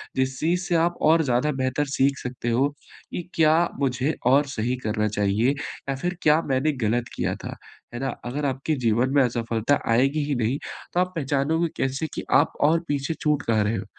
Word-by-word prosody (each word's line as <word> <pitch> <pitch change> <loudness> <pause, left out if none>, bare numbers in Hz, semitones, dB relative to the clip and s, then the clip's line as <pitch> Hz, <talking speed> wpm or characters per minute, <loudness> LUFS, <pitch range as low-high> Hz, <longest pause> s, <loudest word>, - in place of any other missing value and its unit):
जिस 130 0 -1
चीज़ 175 +3 +1
से 175 -1 -1
आप 170 +1 +2
और 165 0 +5
ज़्यादा 125 +3 +1
बेहतर 130 +3 0
सीख 135 +1 +3
सकते 125 -1 -4
हो, 125 +4 +3 0.4
कि - - -3
क्या 155 -1 +5 0.3
मुझे 135 +2 0
और 140 +3 +5
सही 120 +3 0
करना 105 0 0
चाहिए 105 +4 +1
या 140 -1 -5
फिर 175 +6 -3
क्या 155 +1 +5
मैंने 135 +4 +2
गलत 120 +2 0
किया - - -1
था, - - -5 0.4
है - - -4
ना? 135 0 -1 0.2
अगर 140 +4 -3
आपके 135 +3 -1
जीवन 120 +4 +2
में 140 - +6
असफलता 115 +2 0
आएगी 135 +5 +2
ही 145 - +1
नहीं, 120 +4 0 0.4
तो 175 - +1
आप 185 0 -1
पहचानोगे 150 +3 0
कैसे 135 +4 -1
कि - - -4 0.2
आप - - -3 0.2
और 165 - +3
पीछे 145 +1 -1
छूट 150 -2 +1
कहाँ 110 -2 +2
रहे 110 +2 0
हो? - - -5
135 Hz, 195 wpm, -24 LUFS, 120-150 Hz, 0.4 s, में